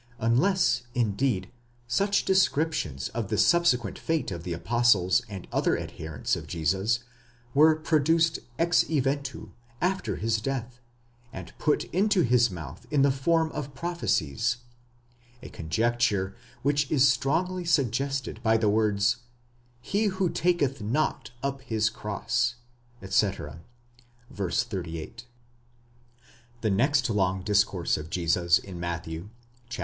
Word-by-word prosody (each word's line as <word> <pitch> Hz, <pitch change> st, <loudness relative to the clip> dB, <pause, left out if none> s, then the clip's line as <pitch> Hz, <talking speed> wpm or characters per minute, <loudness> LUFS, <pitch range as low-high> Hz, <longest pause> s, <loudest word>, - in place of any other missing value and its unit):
unless, 125 Hz, -, +2 dB
indeed, 110 Hz, -3 st, 0 dB, 0.3 s
such 200 Hz, +12 st, +1 dB
descriptions 155 Hz, -, +1 dB
of 115 Hz, -4 st, -4 dB
the -, -, -1 dB
subsequent 125 Hz, -, +3 dB
fate 160 Hz, -9 st, -1 dB
of 85 Hz, -2 st, -5 dB
the 90 Hz, -, -5 dB
apostles 95 Hz, -1 st, +3 dB
and 95 Hz, -3 st, -8 dB
other -, -, +1 dB
adherents 80 Hz, -3 st, -3 dB
of -, -, -7 dB
Jesus 95 Hz, +9 st, 0 dB, 0.5 s
were 155 Hz, +2 st, +6 dB
produced 160 Hz, +1 st, +2 dB, 0.2 s
ex 170 Hz, +1 st, +3 dB
eventu, 140 Hz, -7 st, -2 dB, 0.3 s
after 190 Hz, +2 st, -1 dB
his 110 Hz, 0 st, -1 dB
death, 125 Hz, 0 st, -4 dB, 0.5 s
and 90 Hz, -2 st, -9 dB
put 150 Hz, -, +1 dB
into 195 Hz, +1 st, +3 dB
his 120 Hz, -1 st, +4 dB
mouth 80 Hz, -8 st, -9 dB
in 145 Hz, -2 st, +3 dB
the 140 Hz, -, +4 dB
form 160 Hz, +4 st, +1 dB
of 140 Hz, -2 st, -6 dB
prophecies; 120 Hz, -, -1 dB, 0.9 s
a -, -, -8 dB
conjecture 100 Hz, +2 st, 0 dB, 0.3 s
which 145 Hz, 0 st, +1 dB
is 140 Hz, -2 st, +5 dB
strongly 165 Hz, +8 st, 0 dB
suggested 135 Hz, -5 st, 0 dB
by 110 Hz, -1 st, +3 dB
the 110 Hz, -2 st, +2 dB
words, 105 Hz, +1 st, +2 dB, 0.6 s
He 205 Hz, -, 0 dB
who 185 Hz, -3 st, 0 dB
taketh 150 Hz, -7 st, +1 dB
not 125 Hz, +10 st, -1 dB
up 140 Hz, -1 st, -2 dB
his 110 Hz, -4 st, 0 dB
cross, 120 Hz, +3 st, -1 dB, 0.5 s
etc. 95 Hz, -5 st, 0 dB, 0.7 s
(v. 100 Hz, -, -4 dB
38).° 95 Hz, +1 st, -3 dB, 1.4 s
The 110 Hz, -, +1 dB
next 135 Hz, +6 st, +2 dB
long 95 Hz, -4 st, 0 dB
discourse 100 Hz, -3 st, +1 dB
of 75 Hz, +1 st, -7 dB
Jesus 85 Hz, 0 st, +2 dB
in 95 Hz, -3 st, -8 dB
Matthew 85 Hz, +1 st, -5 dB, 0.4 s
(chap. 120 Hz, -, -6 dB
120 Hz, 125 wpm, -27 LUFS, 95-150 Hz, 1.4 s, were